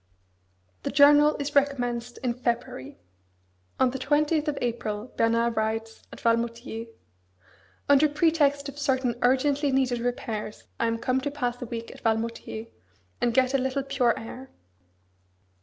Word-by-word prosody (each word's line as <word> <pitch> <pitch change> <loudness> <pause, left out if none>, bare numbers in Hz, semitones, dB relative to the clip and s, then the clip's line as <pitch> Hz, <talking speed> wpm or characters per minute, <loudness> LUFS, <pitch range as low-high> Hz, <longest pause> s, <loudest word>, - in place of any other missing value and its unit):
The - - -3
journal 295 +1 +6
is 285 +1 -4
recommenced 245 -4 0
in 245 -2 +1
February. 235 - -3 0.8
On 255 -1 +4
the 265 - -5
twentieth 300 +3 +1
of 295 -2 -1
April 225 -1 -3
Bernard 230 +1 +2
writes, 225 +1 -2
at - - -10
Valmoutiers: 230 0 -1 1.0
Under 285 +2 +5
pretext 290 -2 +2
of 280 +1 -8
certain 260 -3 +1
urgently 275 +3 +2
needed 260 -2 +1
repairs 230 -3 -4 0.2
I 230 - +2
am 230 0 0
come 255 +3 0
to 285 - -2
pass 245 -4 -3
a 245 - -4
week 230 0 -6
at - - -14
Valmoutiers, 225 0 -2 0.6
and 240 - +2
get 255 +2 +2
a 275 - +3
little 265 +1 -1
pure 255 -3 +1
air. 255 +4 -8
250 Hz, 140 wpm, -26 LUFS, 230-280 Hz, 1.0 s, journal